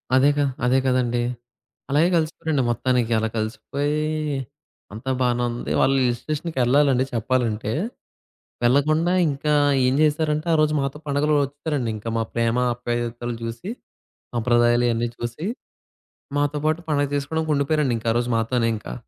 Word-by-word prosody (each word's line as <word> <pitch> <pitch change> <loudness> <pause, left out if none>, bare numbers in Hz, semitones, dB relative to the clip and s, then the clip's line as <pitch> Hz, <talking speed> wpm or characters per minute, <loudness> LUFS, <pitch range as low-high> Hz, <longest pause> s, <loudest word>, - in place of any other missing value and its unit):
అదే 135 +2 +5
గా 145 - +3 0.2
అదే 130 +2 +3
గదండీ! 125 -2 +1 0.7
అలాగే 155 +5 +4
గలిసిపోయారండి 155 -3 0
మొత్తానికి. 120 -1 +1
అలా 110 0 0
కలిసిపోయి 140 +7 -2 0.9
అంతా 120 +5 -5
బానే 120 -1 +1
ఉంది 120 - -4
వాళ్ళు 135 0 +3
హిల్ 120 -1 +1
స్టేషన్‌కెళ్ళాలండి 140 -3 +1
చెప్పాలంటే. 115 -3 0 0.9
వెళ్ళకుండా 155 +7 +3 0.2
ఇంకా 145 +2 -1 0.3
ఏం 130 - +2
జేశారంటే 155 +1 +1
ఆరోజు 155 -1 +3
మాతో 140 +2 -3
పండుగలు 145 +2 +1
ఒచ్చేసారండి. 145 -4 -3
ఇంకా 110 +2 -7
మా - - +1
ప్రేమ, 115 0 +1 0.2
ఆప్యాయతలు 120 0 -3
జూసి, 115 - -5 0.7
సంప్రదాయాలు 120 +1 +3
ఇయన్నీ 115 +1 0
చూసి 120 +8 -5 0.9
మాతో 145 +1 0
పాటు 155 +2 +1
పండగ 145 -2 +1
చేసుకోవడానికి 155 +2 -1
ఉండిపోయారండి 140 -3 +1
ఇంకా 115 - 0
ఆరోజు 120 +1 0
మాతోనే 115 0 +1
ఇంకా. 60 - -7
130 Hz, 130 wpm, -23 LUFS, 120-150 Hz, 0.9 s, అదే